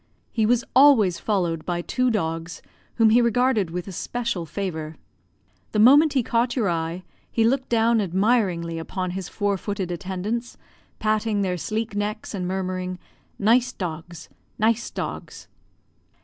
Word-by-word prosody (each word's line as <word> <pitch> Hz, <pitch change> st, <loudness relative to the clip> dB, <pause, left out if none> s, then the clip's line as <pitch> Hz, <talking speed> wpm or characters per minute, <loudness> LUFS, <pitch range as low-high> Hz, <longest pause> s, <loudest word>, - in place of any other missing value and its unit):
He 220 Hz, -2 st, +1 dB
was 245 Hz, +1 st, +3 dB
always 250 Hz, -10 st, +6 dB
followed 175 Hz, -6 st, -1 dB
by 175 Hz, -1 st, -2 dB
two 255 Hz, +6 st, 0 dB
dogs, 165 Hz, -5 st, -3 dB, 0.3 s
whom 225 Hz, -2 st, +4 dB
he 240 Hz, +2 st, +6 dB
regarded 235 Hz, -4 st, +2 dB
with 180 Hz, +2 st, -5 dB
especial 200 Hz, -1 st, -3 dB
favour. 160 Hz, -3 st, -4 dB, 0.8 s
The -, -, 0 dB
moment 285 Hz, +7 st, +7 dB
he 260 Hz, -3 st, +2 dB
caught 235 Hz, +2 st, 0 dB
your 225 Hz, -7 st, +1 dB
eye, 165 Hz, +2 st, -3 dB, 0.3 s
he 225 Hz, -, +2 dB
looked 260 Hz, +3 st, +1 dB
down 230 Hz, -1 st, +3 dB
admiringly 185 Hz, -4 st, +1 dB
upon 185 Hz, +2 st, -4 dB
his 185 Hz, 0 st, -5 dB
four 205 Hz, -2 st, -1 dB
footed 200 Hz, -3 st, -3 dB
attendants, 195 Hz, +7 st, -4 dB, 0.4 s
patting 215 Hz, -1 st, 0 dB
their 185 Hz, -2 st, 0 dB
sleek 215 Hz, +4 st, -3 dB
necks, 210 Hz, +2 st, -3 dB
and 185 Hz, -3 st, -3 dB
murmuring, 185 Hz, -1 st, -3 dB, 0.4 s
"Nice 240 Hz, +4 st, +3 dB
dogs 170 Hz, -4 st, -6 dB, 0.3 s
nice 225 Hz, +2 st, +1 dB
dogs." -, -, -6 dB
205 Hz, 140 wpm, -24 LUFS, 180-230 Hz, 0.8 s, moment